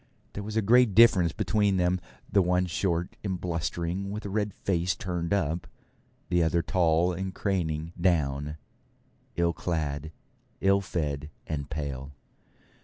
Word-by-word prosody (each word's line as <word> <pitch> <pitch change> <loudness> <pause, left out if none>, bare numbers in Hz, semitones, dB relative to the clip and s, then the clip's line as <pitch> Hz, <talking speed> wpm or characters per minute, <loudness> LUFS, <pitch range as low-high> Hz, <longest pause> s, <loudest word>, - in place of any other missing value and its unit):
There 105 - -4
was 105 +2 -4
a 110 - +2
great 120 -1 +5
difference 95 -8 +6
between 100 +1 +1
them; 90 0 +1 0.3
the 100 - +3
one 90 0 +2
short 85 0 -1
and 95 -3 -2
blustering, 85 +2 -2
with 105 +2 -5
a 100 - -4
red 105 0 0
face 90 -1 0
turned 90 -2 -3
up; 85 -4 0 0.6
the 90 - +3
other 85 +1 +2
tall 85 0 +2
and 95 +1 -4
craning 85 -5 -1
down, 75 -4 +1 0.8
ill 85 0 +2
clad, 80 -3 -2 0.5
ill 100 0 +3
fed, 75 -6 -3 0.2
and 70 -2 -4
pale. 70 -2 -4
90 Hz, 140 wpm, -28 LUFS, 80-95 Hz, 0.8 s, difference